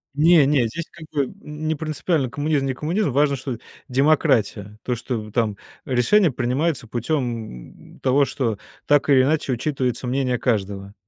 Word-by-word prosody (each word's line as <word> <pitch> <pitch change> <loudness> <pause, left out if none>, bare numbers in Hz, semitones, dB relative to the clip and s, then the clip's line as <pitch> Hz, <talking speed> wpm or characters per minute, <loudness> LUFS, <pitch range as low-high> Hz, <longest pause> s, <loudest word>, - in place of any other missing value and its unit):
Не-не, 150 -4 +5
здесь 165 +9 -5
как 170 -2 -11
бы 140 -4 -1
не 155 +1 -3
принципиально 155 -2 -1
коммунизм- 145 +1 0
не 135 - -1
коммунизм, 165 +6 -1
важно, 140 +2 +2
что 130 -2 -5 0.3
демократия. 115 -7 +1
То, 125 - -1
что, 120 +2 -4
м, 110 -1 -6
там 110 -3 0 0.3
решение 145 - +3
принимается 130 +2 -1
путем, 120 - -4
м, - - -20
того, 135 +2 +3
что 115 -6 -2 0.3
так 145 0 +3
или 135 -2 +6
иначе 145 0 +1
учитывается 130 -1 -2
мнение 125 -1 0
каждого. 100 -4 -2
135 Hz, 150 wpm, -22 LUFS, 120-150 Hz, 0.3 s, или